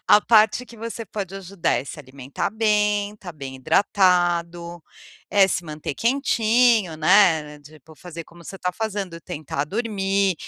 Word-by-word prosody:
a 210 Hz, -, +7 dB
parte 220 Hz, +3 st, +3 dB
que 235 Hz, -, -14 dB
você 230 Hz, 0 st, -6 dB
pode 195 Hz, -3 st, -6 dB
ajudar 195 Hz, -2 st, -2 dB
é 125 Hz, -, -2 dB
se 150 Hz, -, -9 dB
alimentar 135 Hz, +3 st, -5 dB
bem, 210 Hz, -1 st, +1 dB
estar 190 Hz, -4 st, -10 dB
bem 135 Hz, -4 st, -8 dB
hidratado, 175 Hz, +1 st, +1 dB, 0.5 s
é 200 Hz, -2 st, +5 dB
se 180 Hz, -2 st, -2 dB
manter 150 Hz, -2 st, -6 dB
quentinho, 230 Hz, -, +2 dB
né, 160 Hz, -4 st, +3 dB
tipo, 155 Hz, +1 st, -17 dB
fazer 170 Hz, 0 st, -9 dB
como 170 Hz, +1 st, -17 dB
você 190 Hz, +3 st, -9 dB
tá 180 Hz, 0 st, -2 dB
fazendo, 200 Hz, -6 st, -4 dB
tentar 145 Hz, -2 st, -4 dB
dormir, 195 Hz, -1 st, 0 dB
185 Hz, 150 wpm, -22 LUFS, 160-210 Hz, 0.5 s, a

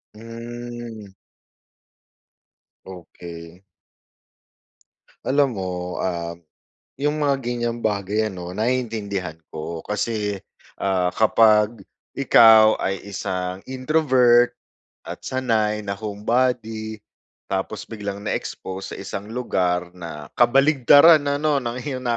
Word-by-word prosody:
Mm. 115 Hz, -2 st, -8 dB, 1.7 s
Okey. 85 Hz, -1 st, -11 dB, 1.6 s
Alam 135 Hz, -5 st, +2 dB
mo, 90 Hz, -1 st, -4 dB
um, 85 Hz, -2 st, -3 dB, 0.6 s
'yong 145 Hz, +2 st, 0 dB
mga 140 Hz, -2 st, +2 dB
ganiyang 120 Hz, -1 st, -2 dB
bagay, 105 Hz, 0 st, 0 dB
ano, 90 Hz, 0 st, -7 dB
naiintindihan 110 Hz, -8 st, -2 dB, 0.2 s
ko. 80 Hz, +1 st, -6 dB
Kasi, 105 Hz, -2 st, -2 dB, 0.4 s
ah, 90 Hz, -2 st, +1 dB
kapag 110 Hz, -1 st, +3 dB, 0.3 s
ikaw 110 Hz, -5 st, +6 dB
ay 95 Hz, -1 st, -2 dB
isang 90 Hz, -1 st, -4 dB
introvert 130 Hz, -3 st, +3 dB, 0.5 s
at -, -, -8 dB
sanay 110 Hz, -5 st, 0 dB
na 100 Hz, -1 st, -4 dB
homebody, 110 Hz, +1 st, -2 dB, 0.5 s
tapos 95 Hz, +2 st, -3 dB
biglang 100 Hz, -3 st, -5 dB
na-expose 95 Hz, -2 st, -5 dB
sa -, -, -5 dB
isang 100 Hz, +2 st, -6 dB
lugar 90 Hz, -7 st, -1 dB
na 80 Hz, -5 st, -8 dB
kabaligtaran, 145 Hz, +4 st, +6 dB
ano, 145 Hz, -1 st, 0 dB
ng 120 Hz, +1 st, -3 dB
iyong 130 Hz, -1 st, -5 dB
110 Hz, 90 wpm, -22 LUFS, 95-120 Hz, 1.7 s, ikaw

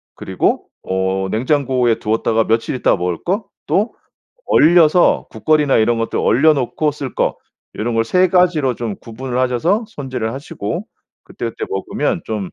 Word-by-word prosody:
그리고 -, -, -1 dB, 0.2 s
어 95 Hz, 0 st, -1 dB
냉장고에 125 Hz, -1 st, +1 dB
두었다가 110 Hz, +1 st, +1 dB
며칠 115 Hz, +3 st, 0 dB
있다가 125 Hz, -, +2 dB
먹을 90 Hz, -1 st, -2 dB
거, 195 Hz, +4 st, -1 dB, 0.2 s
또 210 Hz, +5 st, +1 dB, 0.5 s
얼려서 170 Hz, +1 st, +4 dB
국거리나 150 Hz, -4 st, +2 dB
이런 115 Hz, +1 st, +2 dB
것들 115 Hz, -, -2 dB
얼려 155 Hz, +7 st, +4 dB
놓고 145 Hz, +3 st, -1 dB
쓸 140 Hz, -3 st, -7 dB
거, -, -, 0 dB, 0.4 s
요런 115 Hz, +2 st, -2 dB
걸 115 Hz, -, +3 dB
3 185 Hz, +7 st, +3 dB
가지로 170 Hz, -8 st, +2 dB
좀 115 Hz, -4 st, -4 dB
구분을 125 Hz, +2 st, -6 dB
하셔서 130 Hz, -, +1 dB
손질을 130 Hz, -, -4 dB
하시고 130 Hz, -6 st, -5 dB, 0.4 s
그때 -, -, -7 dB
그때 -, -, -7 dB
먹으면 95 Hz, 0 st, -2 dB
좀 105 Hz, -4 st, -4 dB
125 Hz, 310 characters per minute, -18 LUFS, 110-155 Hz, 0.5 s, 얼려서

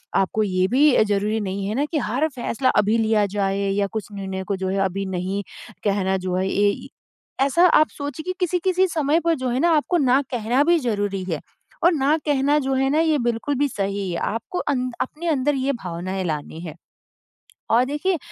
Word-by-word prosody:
आपको 215 Hz, +3 st, +1 dB
ये 185 Hz, -2 st, +1 dB
भी 265 Hz, -1 st, +4 dB
ज़रूरी 210 Hz, +2 st, 0 dB
नहीं 195 Hz, 0 st, -3 dB
है 215 Hz, -, -2 dB
ना 280 Hz, +3 st, +1 dB
की 320 Hz, -, 0 dB
हर 265 Hz, +4 st, 0 dB
फैसला 250 Hz, +1 st, 0 dB
अभी 210 Hz, +2 st, +2 dB
लिया 220 Hz, -2 st, +2 dB
जाए 195 Hz, -1 st, 0 dB
या 200 Hz, 0 st, +1 dB
कुछ 220 Hz, -2 st, -3 dB
निर्णय 190 Hz, -1 st, -5 dB
को 200 Hz, -, 0 dB
जो 190 Hz, 0 st, -3 dB
है 195 Hz, +1 st, -1 dB
अभी 195 Hz, +1 st, -2 dB
नहीं 190 Hz, +2 st, -2 dB, 0.4 s
कहना 195 Hz, -2 st, +1 dB
जो 185 Hz, -1 st, -3 dB
है, 185 Hz, +1 st, 0 dB
ऐ 205 Hz, +1 st, +1 dB, 0.6 s
ऐसा 340 Hz, +6 st, +4 dB
आप 310 Hz, -, +3 dB
सोचिए 285 Hz, +1 st, -5 dB
कि 370 Hz, -, -3 dB
किसी-किसी 365 Hz, +1 st, +1 dB
समय 315 Hz, -2 st, +1 dB
पर 335 Hz, -1 st, +3 dB
जो 260 Hz, -3 st, -3 dB
है 245 Hz, +1 st, 0 dB
ना 345 Hz, -, +3 dB
आपको 310 Hz, +4 st, +1 dB
ना 265 Hz, -3 st, +3 dB
कहना 245 Hz, +3 st, +1 dB
भी 340 Hz, +3 st, +4 dB
ज़रूरी 205 Hz, -6 st, -1 dB
है, 155 Hz, -, -2 dB, 0.4 s
और 345 Hz, +1 st, +5 dB
ना 295 Hz, +2 st, +2 dB
कहना 290 Hz, 0 st, +2 dB
जो 270 Hz, -, +1 dB
है 270 Hz, 0 st, +2 dB
ना, 300 Hz, +3 st, +2 dB
ये 320 Hz, -2 st, +3 dB
बिल्कुल 240 Hz, +4 st, -1 dB
भी 285 Hz, -, +3 dB
सही 200 Hz, -4 st, -3 dB
है। 170 Hz, -, -2 dB, 0.2 s
आपको 360 Hz, -, -4 dB
अंद 255 Hz, -3 st, -1 dB
अपने 310 Hz, +6 st, -4 dB
अंदर 290 Hz, -1 st, +1 dB
ये 270 Hz, +1 st, 0 dB
भावनाएँ 185 Hz, +2 st, -4 dB
लानी 155 Hz, 0 st, -4 dB
है। 155 Hz, -, -8 dB, 1.0 s
और 240 Hz, +2 st, +4 dB
देखिए 300 Hz, +7 st, -1 dB
235 Hz, 205 wpm, -22 LUFS, 195-290 Hz, 1.0 s, और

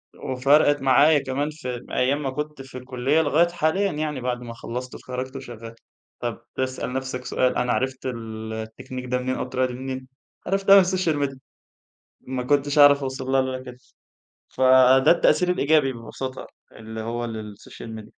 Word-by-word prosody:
وفرِقت 140 Hz, +2 st, +2 dB
معايا 145 Hz, +4 st, +5 dB
كمان 140 Hz, +2 st, -2 dB
في 125 Hz, -6 st, -6 dB
أيام 140 Hz, +3 st, +1 dB
ما 135 Hz, -, -1 dB
كنت 150 Hz, +1 st, -5 dB
في 130 Hz, -1 st, -10 dB
الكلية، 130 Hz, +5 st, 0 dB
لغاية 160 Hz, +3 st, +3 dB
حاليًا 175 Hz, +4 st, 0 dB
يعني 150 Hz, -4 st, -3 dB
بعد 125 Hz, 0 st, -2 dB
ما 120 Hz, -1 st, -7 dB
خلصت 125 Hz, +2 st, -6 dB
واتخرجت 130 Hz, +1 st, -6 dB
وشغال. 115 Hz, -3 st, -9 dB, 0.4 s
طَب 120 Hz, -1 st, -4 dB
تسأل 130 Hz, -1 st, -3 dB
نفسك 130 Hz, -1 st, -4 dB
سؤال 130 Hz, 0 st, +1 dB
أنا 125 Hz, 0 st, 0 dB
عرفت 130 Hz, 0 st, -2 dB
ال 110 Hz, -3 st, -5 dB
التكنيك 110 Hz, +3 st, -7 dB
ده 125 Hz, 0 st, 0 dB
منين؟ 130 Hz, +1 st, -2 dB
أو -, -, -2 dB
الطريقة 130 Hz, 0 st, -1 dB
دي 125 Hz, -, -7 dB
منين؟ 130 Hz, 0 st, -6 dB, 0.4 s
عرفتها 195 Hz, +1 st, +5 dB
من 195 Hz, -, +8 dB
الsocial 165 Hz, -6 st, 0 dB
media. 135 Hz, -, -12 dB, 0.8 s
ما 130 Hz, -1 st, -4 dB
كنتش 145 Hz, +2 st, +1 dB
هاعرف 145 Hz, 0 st, +7 dB
أوصل 130 Hz, 0 st, -4 dB
لها 135 Hz, -, +4 dB
إلا 130 Hz, 0 st, -4 dB
كده، 125 Hz, -1 st, -10 dB, 0.7 s
فده 130 Hz, 0 st, +5 dB
التأثير 170 Hz, +1 st, +3 dB
الإيجابي 150 Hz, -5 st, +2 dB
ببساطة 130 Hz, +3 st, -7 dB, 0.3 s
اللي 110 Hz, 0 st, -8 dB
هو 120 Hz, +1 st, -3 dB
للsocial 110 Hz, -1 st, -9 dB
media. 110 Hz, 0 st, -10 dB
130 Hz, 165 wpm, -24 LUFS, 125-145 Hz, 0.8 s, من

